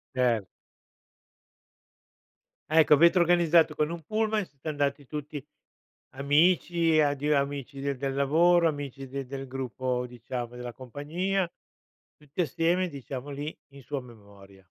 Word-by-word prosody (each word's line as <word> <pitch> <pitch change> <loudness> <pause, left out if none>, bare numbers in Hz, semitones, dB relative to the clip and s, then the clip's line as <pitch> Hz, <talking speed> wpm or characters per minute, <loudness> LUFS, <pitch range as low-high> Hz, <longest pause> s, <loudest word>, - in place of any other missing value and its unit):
Cer 120 -6 +1 2.2
Ecco, 155 -1 +6
avete 170 +5 +5
organizzato 170 -2 +4
con 150 +1 0
un 170 -1 -5
pullman, 215 +1 0
siete 140 +1 -14
andati 145 -2 -1
tutti 150 -1 -6 0.7
amici, 165 +3 +3
ado 145 +1 +1
amici 140 0 -2
di 140 -1 -1
del 135 +1 -2
lavoro, 165 +5 +4
amici 140 -3 -4
de 135 0 -5
del 135 +1 -6
gruppo 130 -1 -3
diciamo, 120 0 -6
della 125 -1 -6
compagnia, 170 +9 -2 0.6
tutti 150 +4 -5
assieme, 170 +4 +1
diciamo, 140 -1 -7
lì 145 +3 -5
in 140 -1 -14
sua 140 +3 -4
memoria. 100 -5 -15
145 Hz, 120 wpm, -28 LUFS, 130-165 Hz, 2.2 s, Ecco